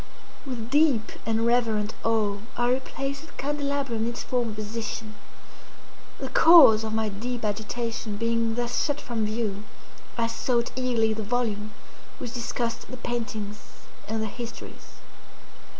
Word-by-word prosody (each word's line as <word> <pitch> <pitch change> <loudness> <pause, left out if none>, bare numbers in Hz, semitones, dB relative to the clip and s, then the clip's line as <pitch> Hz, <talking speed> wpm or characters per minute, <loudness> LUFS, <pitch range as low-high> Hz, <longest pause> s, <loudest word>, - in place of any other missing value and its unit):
With 240 -2 -5
deep 290 -7 +4 0.2
and 225 0 +2
reverent 225 -3 +2
awe 215 -3 +2 0.2
I 240 0 +3
replaced 275 +3 -3
the - - -17
candelabrum 280 -4 -1
in - - 0
its 235 - -5
former 240 -3 0
position. 215 +1 -4 1.0
The - - -4
cause 310 -10 +8
of 220 - -2
my 220 -1 +1
deep 235 +3 -4
agitation 220 +1 -2
being 230 0 +1
thus 240 0 0
shut 290 0 0
from 225 -6 -2
view, 215 -2 -2 0.5
I 230 - +2
sought 235 +1 0
eagerly 240 -4 +2
the 220 - -4
volume 215 -2 -1 0.5
which 240 - -6
discussed 235 -1 -3
the 255 - -7
paintings 220 -4 -3 0.5
and 220 +1 -1
their 220 - -2
histories. 235 +1 -8
230 Hz, 135 wpm, -26 LUFS, 220-245 Hz, 1.0 s, cause